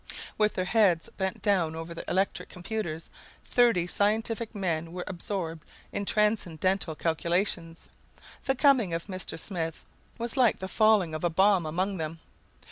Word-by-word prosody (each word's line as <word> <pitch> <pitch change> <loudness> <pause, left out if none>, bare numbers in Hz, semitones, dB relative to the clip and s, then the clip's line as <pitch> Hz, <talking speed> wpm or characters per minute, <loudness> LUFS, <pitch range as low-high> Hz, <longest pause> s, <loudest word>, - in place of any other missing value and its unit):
With 210 0 +2
their 185 - 0
heads 185 -6 +3
bent 190 -1 -3
down 180 -6 +2
over 165 +1 -6
their 165 - -7
electric 190 +2 0
computers, 175 -4 -5 0.3
thirty 235 -8 +3
scientific 220 +4 0
men 170 -4 -2
were 180 0 -4
absorbed 170 -3 -4 0.2
in 200 - -3
transcendental 190 -5 +1
calculations. 170 +1 -1 0.6
The 270 - +2
coming 260 - +4
of 165 0 -2
Mr. 185 -4 -5
Smith 165 -2 -4 0.3
was 235 -1 -3
like 250 -5 +4
the 190 - -5
falling 210 -5 +3
of 155 - -4
a 175 - +3
bomb 190 0 +3
among 185 +5 -1
them. 160 0 -4
185 Hz, 145 wpm, -28 LUFS, 165-210 Hz, 0.6 s, coming